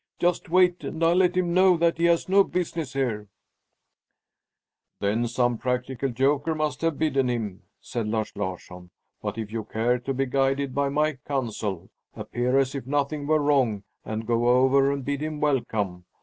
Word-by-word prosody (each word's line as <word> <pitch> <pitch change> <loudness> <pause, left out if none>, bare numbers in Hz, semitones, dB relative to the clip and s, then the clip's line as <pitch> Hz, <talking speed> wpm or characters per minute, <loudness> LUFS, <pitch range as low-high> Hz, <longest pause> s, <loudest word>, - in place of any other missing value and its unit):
Just 175 0 0
wait, 180 0 +3
and 160 - -4
I'll 165 +1 +5
let 180 0 +3
him 175 -2 +1
know 185 -1 +5
that 165 0 +1
he 170 - +3
has 170 -1 +2
no 195 +1 +5
business 170 -6 -3
here!" 115 -6 -2 1.7
"Then 110 +4 0
some 120 0 0
practical 125 +1 -2
joker 140 +6 +1
must 155 -3 -2
have 165 -3 0
bidden 135 -4 +1
him," 110 -6 -3 0.2
said 115 -3 -4
Lars 110 0 -2
Larsson. 90 -2 -6 0.3
"But 105 +1 -4
if 110 -2 -5
you 110 -1 -3
care 115 +4 0
to 130 +3 -4
be 135 +1 0
guided 135 +1 0
by 140 0 +1
my 150 -1 0
counsel, 110 - -3 0.2
appear 125 +2 -1
as 135 -1 +2
if 135 -3 -6
nothing 145 +1 -1
were 155 -1 +2
wrong 130 -8 +2 0.2
and 110 +1 -4
go 120 +1 +1
over 130 +2 +4
and 140 -2 -4
bid 145 0 -2
him 155 -1 -3
welcome. 110 -11 -1
135 Hz, 175 wpm, -25 LUFS, 115-155 Hz, 1.7 s, I'll